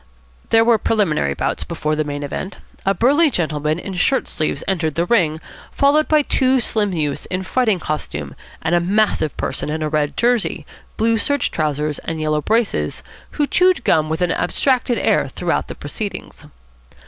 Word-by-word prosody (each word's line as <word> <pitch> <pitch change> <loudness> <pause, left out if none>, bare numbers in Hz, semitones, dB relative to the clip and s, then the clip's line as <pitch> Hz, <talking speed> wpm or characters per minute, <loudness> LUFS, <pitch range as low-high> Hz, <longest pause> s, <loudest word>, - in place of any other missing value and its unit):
There 225 0 +5
were 230 -2 +4
preliminary 160 - +1
bouts - - -2
before 155 0 -2
the 155 - 0
main 145 -1 -5
event. 165 +7 -5 0.3
A 195 - +3
burly 290 +7 +4
gentleman 155 - -1
in 190 +2 -6
shirt 185 +9 +1
sleeves 155 - -2
entered 165 -6 -1
the 170 +1 +1
ring, 170 -7 +2 0.3
followed 290 +2 +3
by 305 -1 +4
two 260 -1 +2
slim 215 -4 +1
youths 150 -5 -2
in 185 +1 -3
fighting 220 -1 +1
costume 75 - -4 0.3
and 160 +2 0
a 175 - +5
massive 190 -4 +1
person 135 - -3
in 155 +1 -2
a 155 - -1
red 150 -1 -1
jersey, 240 -2 +1 0.3
blue 225 0 +2
serge 285 +1 0
trousers, 150 -1 -1
and 160 -1 -5
yellow 155 -1 0
braces, 225 +5 0 0.3
who 295 - +1
chewed 365 +5 +3
gum 155 -1 +2
with 160 +3 -1
an 175 - +1
abstracted 245 +6 +1
air - - +2
throughout - - -2
the - - -7
proceedings. 210 -3 -6
180 Hz, 170 wpm, -19 LUFS, 155-230 Hz, 0.3 s, There